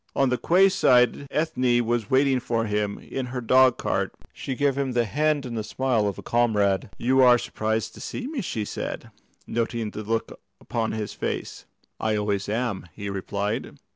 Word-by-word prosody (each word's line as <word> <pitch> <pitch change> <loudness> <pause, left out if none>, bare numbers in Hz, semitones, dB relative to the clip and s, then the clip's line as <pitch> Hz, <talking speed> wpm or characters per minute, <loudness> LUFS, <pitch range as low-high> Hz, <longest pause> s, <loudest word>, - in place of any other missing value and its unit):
On 135 -1 +3
the 125 - +1
quay 185 +3 +5
side 125 -8 +3
Ethne 125 -6 +1
was 115 -2 -1
waiting 135 0 +3
for 115 -2 -1
him 105 -1 -1
in 130 -2 -5
her 125 +1 -4
dog 130 +1 +5
cart; - - -1 0.2
she 135 - -4
gave 140 0 +1
him 135 -2 -1
the 120 -1 +2
hand 150 +4 +1
and 120 -2 -5
the 110 - -2
smile 115 -1 0
of 100 - -3
a - - -8
comrade. 105 -5 +1
"You 130 +2 +3
are 125 -1 +7
surprised 110 -1 -2
to - - -12
see 250 - -5
me," 280 -2 -3
said 110 - -4
she, - - -16 0.4
noting 115 -1 -1
the 105 - -6
look 115 +1 -3 0.2
upon 115 -1 -2
his 110 -2 -4
face. - - -4 0.3
"I 110 -1 0
always 100 -1 -1
am," 110 -4 -2
he 100 -1 -5
replied. 100 +2 -3
120 Hz, 185 wpm, -25 LUFS, 105-130 Hz, 0.4 s, are